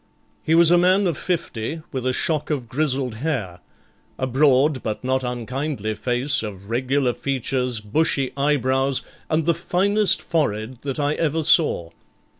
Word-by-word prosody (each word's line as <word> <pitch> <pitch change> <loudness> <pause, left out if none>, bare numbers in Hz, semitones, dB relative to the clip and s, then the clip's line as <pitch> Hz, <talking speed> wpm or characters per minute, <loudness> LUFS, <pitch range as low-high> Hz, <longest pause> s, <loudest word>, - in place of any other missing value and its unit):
He 160 - +2
was 170 0 +6
a 175 - +6
man 185 +3 +3
of 170 -4 0
fifty, 160 -4 -3
with 130 -1 -3
a - - +2
shock 150 +3 0
of 135 -6 -2
grizzled 135 -1 -1
hair, 115 - -3 0.6
a 130 - -1
broad 135 +1 +3
but 110 +1 -4
not 130 +1 0
unkindly 125 -1 -3
face 125 +5 0
of 100 -1 -8
regular 130 +1 +1
features, 125 -3 -1
bushy 135 +4 0
eyebrows, 135 -1 +1 0.3
and 160 -1 +1
the 170 - +3
finest 195 +5 +2
forehead 125 -7 -2
that 140 0 -4
I 145 0 +1
ever 160 0 -1
saw. 115 - +3
135 Hz, 150 wpm, -22 LUFS, 125-155 Hz, 0.6 s, was